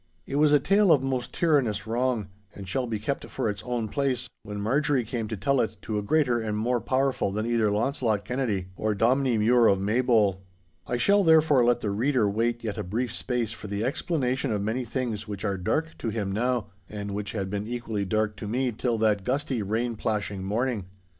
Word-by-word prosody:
It 140 - -3
was 150 0 +4
a 145 - +6
tale 195 +5 +4
of 135 -4 +5
most 130 -2 -2
tyrannous 125 - +1
wrong, 115 -3 -1 0.3
and 100 -2 -8
shall 125 +7 -1
be 110 -2 -2
kept 110 +7 -3
for 130 - -2
its 100 -2 -3
own 120 -3 -2
place, 130 0 -1
when 105 0 -6
Marjorie 135 +4 +1
came 115 -1 -3
to 110 -1 -4
tell 135 +7 +2
it 110 - -2
to 105 -2 -2
a - - -2
greater 125 +2 +2
and 110 -2 -2
more 120 +2 0
powerful 130 -6 0
than 105 +2 -2
either 115 -2 +2
Launcelot 110 -1 0
Kennedy 110 -7 -2
or 110 +1 -1
Dominie 125 +3 +2
Mure 115 +2 +5
of 95 - +3
Maybole. 105 -2 +2 0.5
I 125 - -1
shall, 200 +10 +4
therefore, 160 -6 +5
let 120 0 +3
the 105 - -1
reader 120 +1 +2
wait 115 +3 0
yet 110 -3 -3
a - - -2
brief 115 +6 -2
space 125 -4 -2
for 110 -1 -8
the 100 +1 -2
explanation 130 -2 -1
of 105 -2 -1
many 120 +4 -1
things 115 -3 -3
which 100 -1 -5
are 100 -1 0
dark 155 - -1
to 115 - -2
him 105 -3 -2
now, 115 0 -1 0.2
and 100 -1 -5
which 100 -1 -4
had 95 -3 -3
been 105 +1 -3
equally 115 -4 -3
dark 110 +2 0
to 105 - -6
me 125 +3 0
till 115 +1 -1
that 105 -3 +2
gusty, 130 0 -1
rain 115 +4 -1
plashing 105 -3 -2
morning. 110 +1 -1
115 Hz, 210 wpm, -26 LUFS, 105-130 Hz, 0.5 s, a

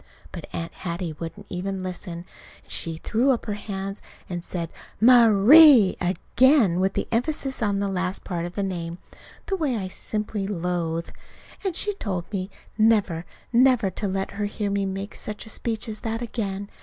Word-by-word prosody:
But - - -8
Aunt 165 0 -5
Hattie 170 -2 -4
wouldn't 170 +6 -8
even 190 +1 -3
listen. 180 -1 -6 0.4
And - - -15
she 165 -1 -2
threw 230 +10 +1
up 255 -4 +1
her 210 - -2
hands 195 -1 -5 0.3
and 175 -2 -5
said 170 -3 -4 0.3
"Ma_rie_!" 235 - +8
again 205 - +3
with 190 +1 +1
the - - -1
emphasis 265 +2 -1
on 205 -2 +1
the 200 0 0
last 185 0 -2
part 175 -2 -3
of 175 - -9
the 200 - -2
name 170 -3 -4 0.5
the 390 - -1
way 295 -9 0
I 190 -3 -3
simply 210 +1 -3
loathe. 170 -3 -2 0.5
And 380 -4 -1
she 415 +3 0
told 190 - -3
me 190 -1 -2 0.3
never, 205 -7 +3 0.3
never 240 -5 +4
to 205 +3 -3
let 195 0 -2
her 205 +1 -2
hear 205 0 -2
me 200 -1 0
make 195 +1 -5
such 210 +1 -5
a - - -10
speech 225 +1 -2
as 215 -1 -5
that 225 +2 -3
again. 205 -4 -4
200 Hz, 175 wpm, -25 LUFS, 180-225 Hz, 0.5 s, Ma_rie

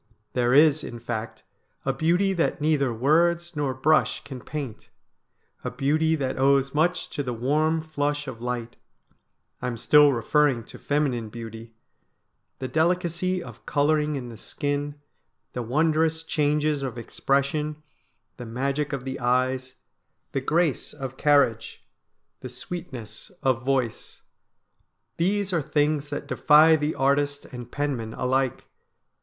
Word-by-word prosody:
There 120 -1 +2
is, 155 0 +5
in 120 - -6
fact, 115 -1 -5 0.4
a - - +1
beauty 180 +5 +2
that 175 -1 0
neither 150 -4 +2
words 170 +8 +2
nor 140 -3 -1
brush 155 +4 +2
can 130 -3 -8
paint, 135 -7 -6 0.7
a - - -2
beauty 155 +3 +1
that 135 -4 -2
owes 135 0 +3
much 170 +4 +1
to - - -2
the 125 -3 -3
warm 155 +7 +1
flush 145 -2 -2
of 120 -3 -7
light 120 -1 -4 0.4
— - - -48
I - - -2
am 120 -2 -3
still 150 +5 +6
referring 130 +1 +2
to - - -13
feminine 135 -6 0
beauty 115 0 -9 0.4
— - - -50
the 130 - -4
delicacy 175 +3 0
of - - -13
colouring 150 +1 +2
in 125 -3 -5
the 115 - -10
skin, 145 +4 -3 0.6
the 125 - -3
wondrous 160 +5 +1
changes 150 -1 +1
of 130 -3 -4
expression, 145 +5 -1 0.5
the 125 - -7
magic 140 +5 -2
of 135 -2 -4
the 130 - -4
eyes, 130 +1 0 0.6
the 135 - -1
grace 155 +1 0
of 135 -1 -6
carriage, 140 -6 +2 0.5
the 130 - -7
sweetness 130 - -7
of 130 -2 +1
voice. 130 -4 -2 0.9
These 195 +3 0
are 170 - +2
things 145 0 0
that 145 - -4
defy 155 +2 +6
the 150 0 -1
artist 140 +1 +1
and 125 -2 -9
penman 130 -6 -2
alike. 130 0 0
145 Hz, 140 wpm, -25 LUFS, 125-155 Hz, 0.9 s, still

